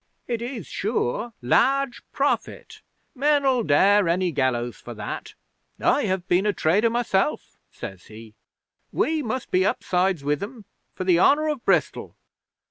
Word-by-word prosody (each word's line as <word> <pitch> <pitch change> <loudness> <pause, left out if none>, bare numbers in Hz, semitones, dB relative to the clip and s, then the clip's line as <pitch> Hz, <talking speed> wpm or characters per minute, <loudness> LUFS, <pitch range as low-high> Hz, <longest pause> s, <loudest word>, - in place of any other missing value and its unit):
'"It 235 -2 -2
is 240 - -5
sure, 210 - -2
large 270 - +2
profit. 280 +1 -2 0.3
Men'll 275 -2 +2
dare 200 +3 +4
any 180 +1 +1
gallows 120 -4 -1
for 120 - -10
that. 105 -1 -6 0.4
I - - +2
have 185 -1 -2
been 185 +4 +2
a 205 - +2
trader 195 +8 +2
myself," 210 -9 -1
says 95 -2 -9
he. 110 0 -12 0.6
"We 315 -1 0
must 255 0 -4
be 185 +1 +3
upsides 185 -4 0
with 145 +4 0
'em 215 +1 -7 0.3
for 185 - -4
the 180 -2 +3
honour 305 +10 +4
of 290 -5 -3
Bristol." - - 0
195 Hz, 140 wpm, -24 LUFS, 155-245 Hz, 0.6 s, dare